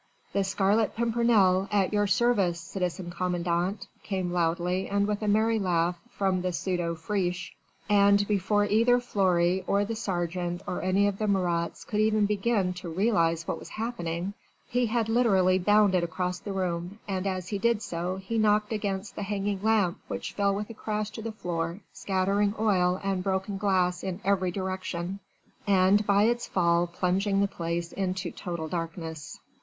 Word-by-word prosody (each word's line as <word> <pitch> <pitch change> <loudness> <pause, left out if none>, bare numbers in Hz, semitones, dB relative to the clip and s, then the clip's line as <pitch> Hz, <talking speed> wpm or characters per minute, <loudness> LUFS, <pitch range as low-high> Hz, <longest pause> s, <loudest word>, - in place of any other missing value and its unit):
"The 200 - +2
Scarlet 195 +3 +1
Pimpernel, 220 -5 +3
at 200 -1 +1
your 205 0 +2
service, 200 -6 +2
citizen 180 +1 -4
commandant," 180 +2 -1 0.2
came 185 -3 -2
loudly 175 +2 0
and 200 0 +1
with 210 0 -2
a 215 - -2
merry 220 +2 +3
laugh 175 -2 0
from 190 -5 0
the 180 0 -1
pseudo 175 -2 -1
Friche. 180 +1 -2 0.3
And 200 0 +4
before 205 0 +2
either 230 +4 +4
Fleury 185 -5 +1
or 200 +1 +2
the 225 +2 -3
sergeant 175 -4 -2
or 180 - -3
any 190 +2 +2
of 200 -1 -1
the 215 - 0
Marats 175 -4 0
could 210 - -2
even 215 -1 +3
begin 205 -2 +1
to 175 - -6
realise 165 -3 +1
what - - -2
was - - -11
happening, 195 -5 -3 0.3
he 245 0 +1
had 225 0 0
literally 195 -6 +3
bounded 200 -2 +4
across 180 +1 -2
the 200 - -6
room, 180 0 -3
and 195 -1 -2
as 185 -2 -3
he 205 - -2
did 230 0 +1
so 175 +2 -3
he 195 +4 -3
knocked 210 0 +2
against 200 -1 -3
the - - -5
hanging 200 -1 -2
lamp 210 -4 +2
which - - -5
fell 200 -1 +1
with 210 +3 -4
a - - -7
crash 215 -1 -3
to 225 - -7
the 225 +1 -4
floor, 170 -3 -3
scattering 200 +2 0
oil 185 -4 +2
and 195 -2 -1
broken 195 +1 -2
glass 180 -3 +1
in 190 0 -3
every 190 -2 +2
direction 185 0 -4 0.5
and 195 +1 +4
by 200 0 +4
its 240 +2 +1
fall 170 -1 +2
plunging 190 +3 0
the 200 - +3
place 170 -2 -3
into 185 -2 -2
total 170 -3 -5
darkness. 165 -2 -5
195 Hz, 170 wpm, -28 LUFS, 180-210 Hz, 0.5 s, And